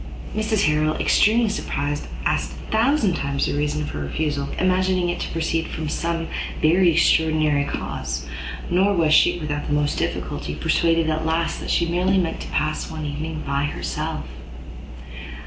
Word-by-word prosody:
Mrs 215 -1 +1
Harrel, 155 +1 +2
extremely 225 +2 +3
surprised, 145 -8 -2 0.2
asked - - 0
a - - -11
thousand 225 -2 +3
times 140 -3 -1
the - - -1
reason 150 +1 -1
of - - -5
her 75 - -5
refusal, 140 - -2
imagining 185 -1 +2
it 175 - -2
to - - -3
proceed 165 0 -1
from 160 -1 -4
some 165 +1 -2 0.3
very 170 +3 +4
extraordinary 155 -3 +3
cause; - - -4 0.5
nor 195 +3 +3
was 160 -3 +3
she, - - +5
without 150 -3 -3
the - - -1
utmost 145 0 0
difficulty, 75 - -3
persuaded 165 - +2
at 160 0 0
last 160 +1 0
that - - -6
she 170 - +2
merely 180 +3 +1
meant 175 -3 0
to - - -6
pass 155 0 -1
one 155 -1 -5
evening 155 +2 -4
by 140 +1 0
herself. 145 - -3
160 Hz, 165 wpm, -22 LUFS, 150-180 Hz, 0.5 s, she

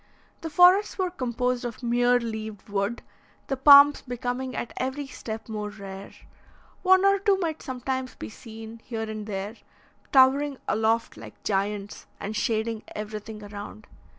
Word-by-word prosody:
The 325 - -4
forests 360 +6 +5
were 370 -2 0
composed 250 -4 -1
of 240 +1 -6
mere 245 +1 +3
leaved 220 -3 -6
wood, 200 +3 -2 0.4
the 270 - -2
palms 285 +2 +8
becoming 250 +1 -4
at 235 - -4
every 265 +3 -2
step 225 -4 -7
more 210 -2 -4
rare; 195 -1 -9 0.7
one 375 0 +5
or 395 0 +4
two 395 0 +3
might 325 -4 -3
sometimes 260 0 -4
be 105 - -7
seen, 225 - -10
here 225 -2 -4
and 215 -1 -6
there, 205 +2 -4 0.5
towering 275 +1 +5
aloft 225 +1 +1
like - - -12
giants, 200 0 -2
and 210 +2 -5
shading 220 +1 -1
everything 215 0 -6
around. 205 +1 -9
235 Hz, 145 wpm, -26 LUFS, 215-265 Hz, 0.7 s, palms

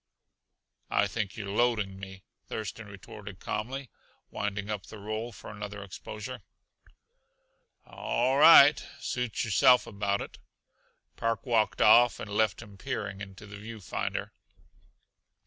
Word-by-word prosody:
"I - - +3
think 100 0 -3
you're 100 -2 -5
loading 105 -4 +1
me," 95 -1 -10 0.2
Thurston 110 0 -5
retorted 100 -1 -10
calmly, 130 +4 -4 0.4
winding 105 0 -3
up 105 -3 -4
the 110 - -10
roll 110 +3 -4
for 105 - -10
another 105 0 -7
exposure. 105 +5 -8 1.4
"All 130 +3 0
right 150 -2 +9 0.2
suit 125 -3 -2
yourself 125 +3 +5
about 100 -3 -1
it." - - -9 0.8
Park 115 +2 -1
walked 115 -4 +2
off 120 +3 +6
and 105 - -7
left 110 +1 +1
him 100 -3 -15
peering 100 0 -4
into 95 0 -9
the 105 0 -10
view 110 +2 -8
finder. 95 - -4
105 Hz, 125 wpm, -29 LUFS, 100-115 Hz, 1.4 s, right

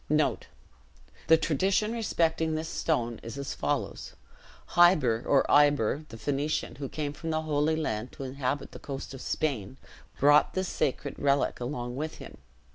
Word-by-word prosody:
The 160 +1 +7
tradition 195 +8 +1
respecting 165 -8 0
this 160 +1 -3
stone 120 -9 -1
is 115 +3 -8
as 140 0 -4
follows: - - -3 0.5
Hiber, 150 -10 +4
or 140 - +4
Iber, 145 0 +3
the 115 - -9
Phoenician, 145 +6 -2
who 135 -2 -5
came 150 -2 -3
from 165 +2 -6
the 160 0 0
Holy 155 0 +1
Land 120 -7 -2
to - - -7
inhabit 135 +1 -3
the - - -10
coast 135 -1 -6
of 135 - -8
Spain, 130 -6 -2 0.4
brought 145 +2 +5
this 185 -1 -1
sacred 140 +1 -2
relic 140 0 +1
along 120 -1 -4
with 155 +2 -3
him. - - -11
145 Hz, 150 wpm, -28 LUFS, 130-160 Hz, 0.5 s, The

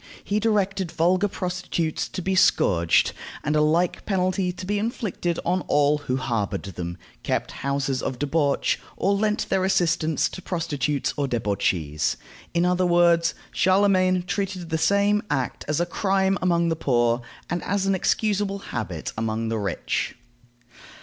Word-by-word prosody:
He 205 +1 0
directed 200 -4 0
vulgar 180 +4 +2
prostitutes 180 -4 -2
to 185 - -5
be 190 - 0
scourged, 85 - +3 0.3
and 150 +1 0
a 150 - +4
like 165 +4 +1
penalty 185 -2 0
to 180 +1 -8
be 205 +2 0
inflicted 205 -6 -2
on 180 +2 +1
all 145 0 +3
who 130 -3 -2
harbored 115 -6 -2
them, 85 -2 -6 0.2
kept - - -1
houses 140 -1 -1
of 130 - -3
debauch, 145 +1 +1 0.2
or 200 - +2
lent 210 +1 0
their 190 -1 +1
assistance 165 -4 +2
to 185 - -8
prostitutes 150 -6 -1
or 145 -1 0
debauchees. 95 - 0 0.3
In 170 +1 +1
other 180 0 +2
words, 170 -1 +4 0.2
Charlemagne 185 -1 +3
treated 185 -2 -3
the 160 - 0
same 200 +3 +3
act 135 -4 -2
as 150 +1 0
a 175 - +2
crime 190 +2 +1
among 170 -2 +2
the 165 - +1
poor, 120 -5 +1 0.3
and 175 0 -3
as 200 0 0
an 195 - +2
excusable 200 +1 0 0.2
habit 95 -9 -4
among 110 0 -2
the 115 -1 -1
rich. 100 -3 -2
170 Hz, 150 wpm, -24 LUFS, 140-190 Hz, 0.3 s, a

